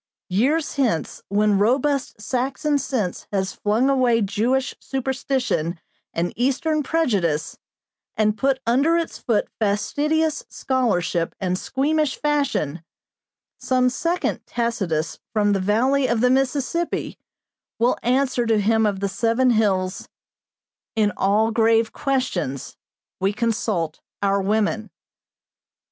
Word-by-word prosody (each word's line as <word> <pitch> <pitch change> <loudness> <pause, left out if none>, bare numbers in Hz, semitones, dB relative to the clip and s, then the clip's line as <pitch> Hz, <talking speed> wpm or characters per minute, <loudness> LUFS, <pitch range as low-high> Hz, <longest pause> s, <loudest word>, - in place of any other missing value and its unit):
Years 280 - +1
hence, 230 - 0
when 205 0 +2
robust 260 +3 +1
Saxon 265 +6 -1
sense 235 -9 -3
has 190 -1 -1
flung 220 +5 +1
away 255 -4 +3
Jewish 235 +7 0
superstition 260 - -2 0.3
and 170 +1 -2
Eastern 275 +6 +1
prejudice, 205 - 0 0.6
and 215 -1 +2
put 265 +2 +1
under 275 +8 +3
its 335 -1 -3
foot 225 -4 0
fastidious 295 +10 0
scholarship 200 -10 0
and 185 -1 0
squeamish 285 +7 0
fashion, 280 - -1 0.8
some 255 -1 +2
second 340 +7 -1
Tacitus 205 -10 -2
from 205 -2 +2
the 195 - +1
valley 255 +8 +2
of 235 -1 +1
the 250 0 +4
Mississippi 270 +5 -1 0.6
will 240 +2 +2
answer 255 -1 +1
to 220 -2 +3
him 220 +1 +3
of 200 -2 -2
the 200 - +1
Seven 230 +5 +2
Hills: 195 -4 0 0.9
'In 215 -2 +2
all 215 +3 +2
grave 225 0 +3
questions, 225 - -2 0.4
we 195 +2 +1
consult 210 -8 -1 0.2
our 200 0 +2
women.' 215 +2 0
230 Hz, 115 wpm, -22 LUFS, 200-270 Hz, 0.9 s, the